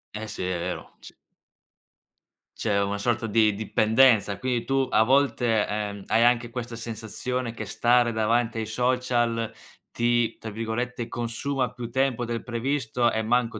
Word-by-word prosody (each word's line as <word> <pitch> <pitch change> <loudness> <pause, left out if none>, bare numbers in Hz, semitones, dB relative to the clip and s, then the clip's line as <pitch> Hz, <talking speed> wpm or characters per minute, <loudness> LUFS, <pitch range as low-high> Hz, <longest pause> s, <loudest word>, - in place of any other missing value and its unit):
Eh, 110 +1 -5
sì, 105 - -5
è 90 -1 -1
vero. 90 +2 -5
C - - -13 1.4
C'è 105 -3 +1
una 100 +1 -1
sorta 115 +2 -1
di 110 -1 +3
dipendenza. 110 0 +3
Quindi, 125 -1 -1
tu 135 -1 +1
a 110 - +4
volte, 125 -4 +2
ehm, 105 -1 -4
hai 115 - +3
anche 120 -1 +3
questa 120 -1 -6
sensazione 115 +2 -4
che 110 - -6
stare 120 +3 +2
davanti 115 +1 +1
ai 110 - -2
social 120 -1 0 0.4
ti, 120 -1 +1
tra 110 - -7
virgolette, 115 +2 -3
"consuma" 125 +3 -2
più 120 -2 -6
tempo 130 -1 +1
del 115 -1 -3
previsto, 120 -1 0
e 110 - 0
manco 115 -1 0
115 Hz, 150 wpm, -26 LUFS, 110-125 Hz, 1.4 s, a